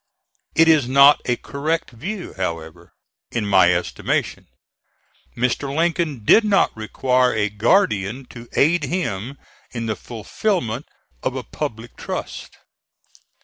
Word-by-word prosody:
It 165 0 +5
is 155 -6 +4
not 140 +2 +6
a 125 - +1
correct 155 +6 -3
view, 180 - -6
however, 85 -4 -5 0.4
in 115 -3 -2
my 95 -3 +5
estimation. 90 0 -2 0.9
Mr. 125 +3 -1
Lincoln 165 -8 0
did 225 - +6
not 205 -2 +2
require 125 +3 +1
a 105 -1 +1
guardian 105 - +1
to 120 -1 -11
aid 155 +1 +3
him 135 - -3 0.3
in 115 -2 -5
the 110 -1 -1
fulfilment 120 - -3 0.3
of 130 - -2
a 130 - -4
public 120 -6 -6
trust. - - -6
125 Hz, 120 wpm, -21 LUFS, 110-155 Hz, 0.9 s, not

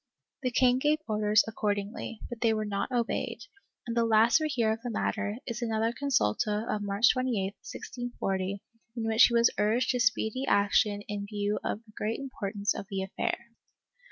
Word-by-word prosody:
The 255 - 0
king 250 0 +3
gave 300 +3 +3
orders 210 -1 +3
accordingly, 210 0 -3
but 240 -2 -8
they 225 -2 +3
were 215 0 -1
not 200 +3 -2
obeyed, 240 -2 -1 0.4
and 235 -1 -4
the 235 - +3
last 225 +5 +5
we 310 - 0
hear 235 -6 +1
of 220 +1 -3
the 245 - -4
matter 210 -1 -2
is 235 -1 -4
another 225 0 0
consulta 215 - 0
of 210 - -1
March 205 +3 +3
28, 255 -6 0 0.2
1640, 195 -6 -4 0.3
in 230 - -3
which 225 0 +6
he 235 - +1
was 235 0 +4
urged 220 +5 +2
to 250 - -1
speedy 220 +2 +1
action 205 0 +3
in 205 -1 -4
view 205 0 -1
of 215 - -3
the 215 - -18
great 215 +2 -2
impor 255 -8 -5
tance 205 0 0
of 195 - -7
the 195 -1 -2
affair. 235 +4 -3
220 Hz, 185 wpm, -29 LUFS, 205-240 Hz, 0.4 s, which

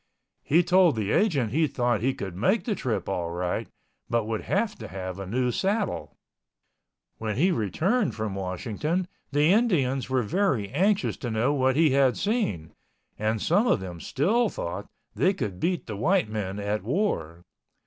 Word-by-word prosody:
He 170 +5 +3
told 180 -4 +4
the 105 -2 -1
agent 140 - +2
he 155 +4 +2
thought 120 -5 0
he 130 +3 +1
could 95 -3 -6
make 185 - +2
the 230 - 0
trip 130 - -2
all 85 -3 -2
right, 90 +1 -2 0.4
but 115 -2 +1
would 110 -1 -2
have 210 +1 0
to 110 - -7
have 95 -1 -6
a 100 - -5
new 125 +4 0
saddle. 200 - -1 1.0
When 110 -2 -2
he 175 - +3
returned 180 - 0
from 110 -2 -3
Washington, 110 - -2 0.2
the 145 +4 +4
Indians 140 - +1
were 130 -1 +1
very 125 - 0
anxious 195 - +1
to 120 - -4
know 115 +5 +1
what 130 -2 +2
he 155 -1 +4
had 135 -2 +3
seen 200 - -1 0.5
and 110 +1 0
some 200 - +2
of - - +3
them 90 -3 -7
still 210 - +1
thought 90 - -5 0.2
they 190 +1 +2
could 100 - -4
beat 175 0 -1
the 110 - -5
white 170 - +2
men 100 -3 -3
at 105 +1 -2
war. 90 - -1
125 Hz, 170 wpm, -26 LUFS, -, 1.0 s, told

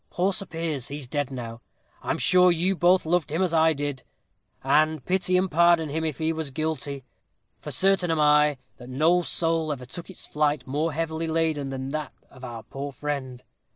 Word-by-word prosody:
Poor 190 +3 0
Sir 195 - -4
Piers, 160 -6 -4
he's 145 -1 -6
dead 145 +2 -2
now. 120 -3 -7 0.4
I'm - - -1
sure 180 +1 +5
you 175 +3 +1
both 180 +1 +3
loved 165 -2 +1
him 165 +5 +1
as 180 -3 0
I 160 0 +4
did, 145 -2 -4 0.6
and 155 +1 +2
pity 185 0 +1
and 185 0 0
pardon 170 -1 +4
him 160 +3 -2
if 155 -3 -2
he 160 0 0
was 160 -2 -4
guilty; 145 -2 -3 0.6
for - - -8
certain 190 -2 +2
am 160 -1 +1
I 150 -1 +4 0.2
that 125 - -11
no 160 +7 +3
soul 165 -2 0
ever 130 -3 -5
took 170 +9 -9
its 190 - -9
flight 150 -2 0
more 150 +5 -1
heavily 160 +1 -2
laden 160 -3 0
than 135 0 -4
did - - -6
that 155 -2 -4 0.2
of 130 -1 -15
our 120 -3 -7
poor 140 +1 -6
friend. 130 -3 -5
155 Hz, 195 wpm, -25 LUFS, 140-165 Hz, 0.6 s, sure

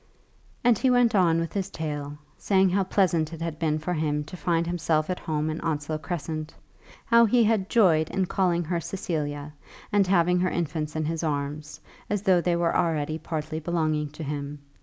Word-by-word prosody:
And 240 -3 +4
he 260 - +3
went 245 -2 +4
on 170 -5 +4
with 165 0 -3
his 195 -1 -2
tale, 150 -4 -5 0.2
saying 190 -1 +2
how 195 +1 +2
pleasant 170 -5 +1
it 165 - -8
had 165 -2 -4
been 155 -2 +1
for 160 +4 -3
him 150 -2 -1
to 165 - -10
find 170 -1 0
himself 165 -1 0
at 180 - -3
home 155 -1 -2
in 155 0 -3
Onslow 155 -1 -2
Crescent, 155 0 -5 0.5
how 235 0 +6
he 235 +2 +4
had 215 -3 +1
joyed 165 -9 +4
in 190 -1 0
calling 175 -2 +1
her 170 +1 -1
Cecilia, 150 -5 -4 0.4
and 200 -2 +4
having 180 -1 +3
her 185 0 +1
infants 155 -2 -3
in 155 -1 -1
his 160 +1 -2
arms, 150 -1 -3 0.3
as 205 -1 -1
though 185 -3 +4
they 175 0 +1
were 170 -1 +1
already 155 -1 0
partly 155 -1 -4
belonging 155 -2 -1
to 150 +2 -8
him. 145 0 -4
165 Hz, 190 wpm, -26 LUFS, 155-185 Hz, 0.5 s, how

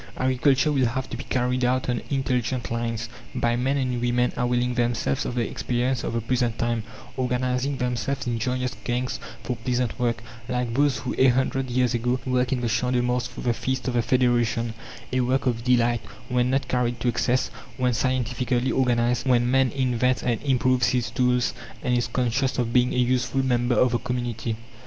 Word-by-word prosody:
Agriculture 130 +3 +2
will 135 -4 +2
have 130 +3 -3
to - - -3
be - - -6
carried 125 0 0
out 125 +1 +1
on 120 -2 0
intelligent 130 -3 -1
lines, 115 -1 -2 0.3
by 120 0 +1
men 130 +3 +1
and 125 -3 -1
women 125 0 +1
availing 125 0 +1
themselves 120 - 0
of 125 - -4
the 120 -3 0
experience 125 0 -1
of - - -3
the 115 - 0
present 120 0 0
time, 120 -1 0 0.4
organizing 130 +2 0
themselves 125 +3 -2
in 120 -2 -1
joyous 125 +1 -1
gangs 125 +1 -2 0.2
for 125 +1 -3
pleasant 125 +1 -1
work, 120 -2 0 0.3
like 125 -2 -1
those 140 +1 +2
who, 125 - -4
a 130 - +6
hundred 130 +1 +1
years 125 -1 +1
ago, 125 +2 0
worked 125 -1 +1
in 130 -2 0
the 120 - 0
Champ 125 +3 0
de 125 - +3
Mars 125 0 0
for - - -9
the 120 - +1
Feast 130 +2 -2
of 125 - 0
the 120 - +2
Federation 120 -1 +1 0.4
a 130 - +2
work 130 +2 +1
of 115 -2 0
delight, 120 -2 +3 0.3
when 125 0 +2
not 135 +2 0
carried 120 -1 0
to - - -2
excess, 125 +1 +1 0.3
when 125 -1 +1
scientifically 125 +1 0
organized, 120 -1 +1
when 120 -1 +3
man 135 -1 +3
invents 125 -1 +1
and 120 -3 0
improves 130 -3 +2
his 125 -2 0
tools 125 -1 +1 0.3
and 125 -3 +1
is 120 - +1
conscious 130 +1 0
of 120 -2 -1
being 125 0 +4
a - - -2
useful 125 +1 +1
member 120 -1 +2
of 125 +3 +4
the 120 - +1
community. 120 -2 -3
125 Hz, 195 wpm, -25 LUFS, 120-130 Hz, 0.4 s, a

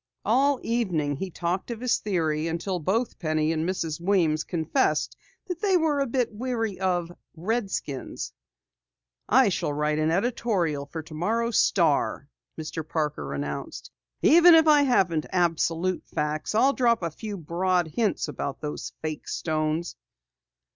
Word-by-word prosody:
All 270 +5 +3
evening 175 - 0
he 190 +5 -4
talked 175 +4 -3
of 235 -2 -4
his 250 0 +1
theory 160 -6 -1
until 175 +3 -2
both 215 +9 -1
Penny 155 -1 0
and 160 +2 -1
Mrs. 165 -4 -3
Weems 170 -5 +2
confessed 170 - 0 0.3
that 360 -1 -5
they 390 -3 +3
were 315 -4 +1
a 275 - +1
bit 245 -2 -1
weary 225 -3 -2
of 175 -3 0 0.2
redskins. 190 - -3 1.0
"I 255 -1 +5
shall 175 - -1
write 150 +1 0
an 155 0 +2
editorial 180 - 0
for 160 +2 -6
tomorrow's 220 +10 0
Star," 155 -5 +2 0.3
Mr. 160 +1 -4
Parker 150 - -3
announced. 70 0 -5 0.3
"Even 340 +2 +8
if 320 -1 +5
I 300 -1 +7
haven't 185 - +2
absolute 175 0 0
facts, 150 +6 -2
I'll 265 +5 +4
drop 235 -7 +2
a 170 - -1
few 205 +5 -6
broad 175 +1 0
hints 210 +2 0
about 140 -2 -4
those 150 -1 -5
fake 155 -2 -4
stones!" 155 +1 -2
180 Hz, 140 wpm, -26 LUFS, 155-230 Hz, 1.0 s, Even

